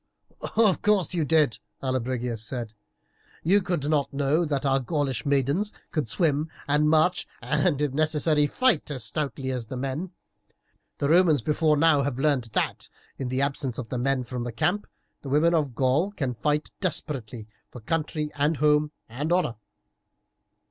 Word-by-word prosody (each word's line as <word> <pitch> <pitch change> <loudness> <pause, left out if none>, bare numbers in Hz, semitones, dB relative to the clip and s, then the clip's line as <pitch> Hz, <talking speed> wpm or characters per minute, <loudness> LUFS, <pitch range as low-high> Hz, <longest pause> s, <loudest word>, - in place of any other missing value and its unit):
"Of 215 -4 +4
course 200 -5 +2
you 170 -3 +1
did," 150 -5 +2 0.2
Allobrigius 125 -3 -2
said; 115 -1 -5 0.7
"you 195 +5 +4
could 175 -6 -2
not 150 -2 +1
know 145 +4 +1
that 145 -2 -1
our 135 0 +3
Gaulish 140 0 -2
maidens 140 - +1 0.2
could 155 -6 -1
swim 155 - +1 0.2
and 150 +1 +3
march, 160 +4 +3
and, 165 -7 +1
if 145 -3 0
necessary, 150 0 +2
fight 255 - +2
as 130 -5 -5
stoutly 135 +2 -3
as 125 -3 -4
the 130 - -6
men. 135 +8 -3 0.9
The 140 - 0
Romans 160 -6 +4
before 150 +1 +2
now 155 -1 +4
have 135 -3 -2
learned 140 -3 +1
that, - - -1 0.3
in 135 - -2
the 130 +2 -1
absence 135 -3 -2
of 120 -3 -6
the 125 - -2
men 135 0 0
from 120 0 -5
the 120 - -4
camp, 175 - 0 0.3
the 140 - -7
women 155 +5 +3
of 145 -7 0
Gaul 135 +9 +2
can 135 -11 -3
fight 150 +5 -1
desperately 130 - -4 0.2
for 125 - -10
country, 150 +4 -2
and 145 +2 +1
home, 150 +1 +3 0.2
and 140 +8 -4
honour. 175 -8 +2
145 Hz, 160 wpm, -26 LUFS, 130-160 Hz, 0.9 s, Of